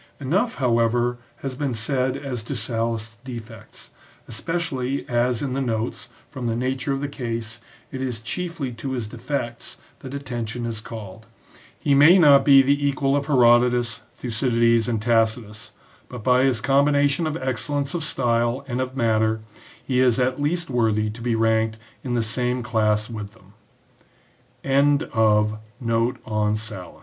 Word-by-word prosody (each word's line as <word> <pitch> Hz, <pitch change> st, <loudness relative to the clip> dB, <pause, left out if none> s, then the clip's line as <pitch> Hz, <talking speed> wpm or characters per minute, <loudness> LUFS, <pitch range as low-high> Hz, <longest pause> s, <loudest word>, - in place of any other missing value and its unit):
Enough, 185 Hz, -, 0 dB
how 120 Hz, -4 st, +2 dB
ever, 120 Hz, +1 st, +1 dB, 0.2 s
has 135 Hz, -1 st, -3 dB
been 135 Hz, -1 st, -2 dB
said 130 Hz, +3 st, 0 dB
as 135 Hz, -4 st, -4 dB
to 115 Hz, +6 st, -5 dB
Sallust's 115 Hz, -1 st, -2 dB
defects, 115 Hz, -3 st, -10 dB, 0.4 s
especially 135 Hz, -1 st, -2 dB
as 120 Hz, 0 st, 0 dB
in 135 Hz, -3 st, -2 dB
the 135 Hz, -, -1 dB
notes, 115 Hz, 0 st, -3 dB, 0.2 s
from 130 Hz, -5 st, -5 dB
the 115 Hz, -, 0 dB
nature 130 Hz, +3 st, -2 dB
of 135 Hz, 0 st, -1 dB
the 145 Hz, -, -1 dB
case, 115 Hz, -4 st, -5 dB, 0.3 s
it 130 Hz, -, -5 dB
is 125 Hz, -4 st, -3 dB
chiefly 165 Hz, +2 st, -4 dB
to 125 Hz, +3 st, -5 dB
his 120 Hz, -4 st, -2 dB
defects 120 Hz, +1 st, -5 dB, 0.2 s
that 135 Hz, +1 st, -8 dB
attention 120 Hz, -4 st, -4 dB
is 115 Hz, -2 st, -4 dB
called. 110 Hz, -1 st, -9 dB, 0.5 s
He 140 Hz, -, +1 dB
may 150 Hz, +7 st, +7 dB
not 145 Hz, -5 st, +7 dB
be 135 Hz, -2 st, +7 dB
the 140 Hz, +2 st, +1 dB
equal 140 Hz, 0 st, +1 dB
of 140 Hz, -1 st, -1 dB
Herodotus, 120 Hz, -3 st, +3 dB
Thucydides, 115 Hz, -1 st, +1 dB
and 115 Hz, -2 st, 0 dB
Tacitus, 110 Hz, -1 st, 0 dB, 0.4 s
but 125 Hz, -3 st, -8 dB
by 125 Hz, +2 st, +4 dB
his 125 Hz, -5 st, +1 dB
combination 145 Hz, +3 st, +2 dB
of 155 Hz, +1 st, -2 dB
excellence 135 Hz, +3 st, -2 dB
of 170 Hz, -2 st, -2 dB
style 120 Hz, -2 st, 0 dB
and 125 Hz, -1 st, -2 dB
of 130 Hz, +1 st, -4 dB
matter, 110 Hz, -2 st, +1 dB, 0.4 s
he 125 Hz, -2 st, +1 dB
is 125 Hz, -2 st, +4 dB
at 130 Hz, +2 st, 0 dB
least 170 Hz, +3 st, 0 dB
worthy 110 Hz, -3 st, +1 dB
to 115 Hz, +2 st, -10 dB
be 120 Hz, -1 st, 0 dB
r 110 Hz, 0 st, +2 dB
125 Hz, 135 wpm, -23 LUFS, 115-140 Hz, 0.5 s, may